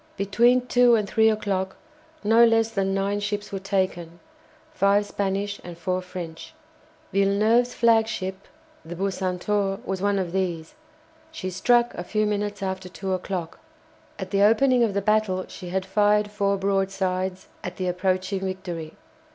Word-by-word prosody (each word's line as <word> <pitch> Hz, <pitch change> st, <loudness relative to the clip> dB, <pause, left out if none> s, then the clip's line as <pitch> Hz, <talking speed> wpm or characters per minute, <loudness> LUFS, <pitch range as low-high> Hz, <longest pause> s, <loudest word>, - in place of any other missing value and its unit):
Between 235 Hz, +6 st, +3 dB
two 245 Hz, -1 st, +5 dB
and 210 Hz, -2 st, 0 dB
three 220 Hz, +2 st, +4 dB
o'clock 195 Hz, -3 st, -1 dB, 0.5 s
no 225 Hz, +3 st, +5 dB
less 225 Hz, -1 st, +3 dB
than 195 Hz, -3 st, 0 dB
nine 195 Hz, +1 st, 0 dB
ships 205 Hz, 0 st, -3 dB
were 195 Hz, -, -3 dB
taken, 185 Hz, -3 st, -2 dB, 0.5 s
five 205 Hz, -6 st, +3 dB
Spanish 200 Hz, 0 st, -2 dB
and 175 Hz, -1 st, -9 dB
four 185 Hz, +2 st, -2 dB
French. 180 Hz, -, -8 dB, 0.6 s
Villeneuve's 215 Hz, +5 st, +3 dB
flagship, 220 Hz, -5 st, +1 dB, 0.4 s
the 170 Hz, +2 st, -8 dB
"Bucentaure," 195 Hz, +1 st, -1 dB
was 190 Hz, -1 st, -3 dB
one 200 Hz, 0 st, +1 dB
of 185 Hz, -3 st, -2 dB
these. 175 Hz, -4 st, -2 dB, 0.6 s
She 185 Hz, -13 st, -5 dB
struck 240 Hz, +6 st, +2 dB
a 175 Hz, -, -5 dB
few 215 Hz, +3 st, 0 dB
minutes 205 Hz, -1 st, -2 dB
after 190 Hz, -1 st, -4 dB
two 190 Hz, +1 st, -4 dB
o'clock. 185 Hz, -2 st, -4 dB, 0.6 s
At -, -, -6 dB
the 200 Hz, -1 st, +2 dB
opening 245 Hz, +4 st, +4 dB
of 210 Hz, -4 st, 0 dB
the 200 Hz, -, 0 dB
battle 210 Hz, -3 st, +1 dB
she 180 Hz, -2 st, -9 dB
had 190 Hz, +1 st, -2 dB
fired 210 Hz, +1 st, +2 dB
four 200 Hz, -1 st, 0 dB
broadsides 190 Hz, -1 st, -1 dB, 0.2 s
at -, -, -5 dB
the 185 Hz, -, -2 dB
approaching 185 Hz, +2 st, 0 dB
"Victory." 185 Hz, -4 st, -5 dB
195 Hz, 150 wpm, -24 LUFS, 185-210 Hz, 0.6 s, two